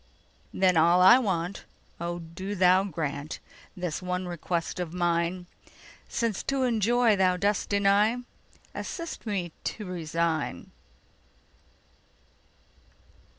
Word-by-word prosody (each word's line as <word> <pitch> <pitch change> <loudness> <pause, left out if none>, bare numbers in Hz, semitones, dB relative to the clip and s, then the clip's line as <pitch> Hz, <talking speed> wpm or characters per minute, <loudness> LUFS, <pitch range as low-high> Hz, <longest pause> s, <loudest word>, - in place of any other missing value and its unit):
Then 185 -2 +3
all 170 +3 +5
I 215 +8 +8
want—O 175 -3 -4
do 175 +4 -6
Thou 185 +1 +4
grantThis 160 +2 -5
one 180 0 -3
request 170 0 -3
of 175 -1 -4
mine!—Since 175 +5 -3
to 275 -1 -1
enjoy 235 -1 +3
Thou 185 -2 +2
dost 200 +2 0
deny, 200 +3 +3 0.6
Assist 335 -8 -6
me 185 -5 -2
to 210 - -4
resign. 165 - -2
180 Hz, 90 wpm, -27 LUFS, 170-205 Hz, 0.6 s, I